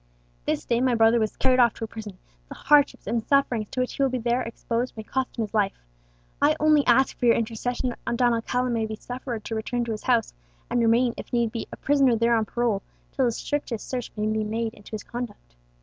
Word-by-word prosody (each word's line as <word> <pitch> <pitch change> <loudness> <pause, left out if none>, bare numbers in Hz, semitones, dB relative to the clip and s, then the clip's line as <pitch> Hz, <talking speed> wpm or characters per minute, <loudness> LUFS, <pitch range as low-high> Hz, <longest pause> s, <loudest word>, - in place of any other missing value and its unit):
"This - - -1
day 235 0 +1
my 255 -2 +3
brother 225 +1 +5
was 220 -1 -1
carried 255 -1 +3
off 235 -3 +5
to - - -7
a - - -2
prison; 215 -4 -9 0.3
the - - -8
hardships 290 0 +3
and 230 0 0
sufferings 250 -6 +2
to 255 - -4
which 255 - -2
he - - -4
will 270 - +4
there 245 0 0
be - - -6
exposed 235 +1 -3
may 220 - -5
cost 260 +4 -3
him 230 - 0
his 210 - -7
life. 205 -3 +1 0.6
I - - +4
only 305 -1 +4
ask 265 +2 +4
for 245 - 0
your 230 - +6
intercession 235 +3 -2
that 235 0 -4
Don 245 -1 +3
Alcala 245 +2 -1
may 225 -2 0
be 220 - -5
suffered 245 -1 -6
to - - -4
return 235 +2 -2
to 230 - -3
his 215 - -4
house, 240 -3 +2 0.4
and 245 - +2
remain, 235 +1 +3
if - - -8
need 235 -2 +1
be, 230 -1 -5
a - - -8
prisoner 275 -4 +3
there 230 +1 +3
on 220 -1 +1
parole, 230 -2 0 0.3
till 265 - +1
the 240 - +2
strictest 245 -2 -3
search 250 -2 -4
be 210 -1 -2
made 220 +1 -1
into 205 - -15
his 215 - -4
conduct. 240 - -7
235 Hz, 235 wpm, -25 LUFS, 225-255 Hz, 0.6 s, your